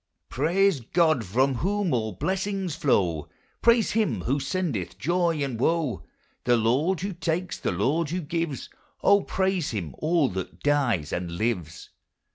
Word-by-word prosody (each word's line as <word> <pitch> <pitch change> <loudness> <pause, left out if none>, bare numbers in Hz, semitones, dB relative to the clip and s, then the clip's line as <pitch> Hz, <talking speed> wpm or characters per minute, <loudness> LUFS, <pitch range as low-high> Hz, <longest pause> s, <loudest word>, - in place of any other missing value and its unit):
"Praise 170 - +2
God 155 +1 +2
from 130 +8 +1
whom 195 - 0
all 110 -3 -1
blessings 190 - -2
flow," 90 - +1 0.3
Praise 235 -2 +4
him 205 - +1
who 135 +9 0
sendeth 135 - -2
joy 170 -2 +1
and 130 -5 -3
woe. 150 - 0 0.4
The 120 -1 +3
Lord 140 +11 +1
who 195 +1 -3
takes, 170 +1 -2
the - - -1
Lord 140 - 0
who 180 +3 -2
gives, 165 -2 -3 0.4
O, 200 0 +6
praise 190 -5 0
him, 95 -9 -4
all 160 -2 +2
that 95 -1 -6
dies, 125 - +1
and 90 -1 -2
lives. 90 -5 -3
150 Hz, 145 wpm, -26 LUFS, 115-180 Hz, 0.4 s, O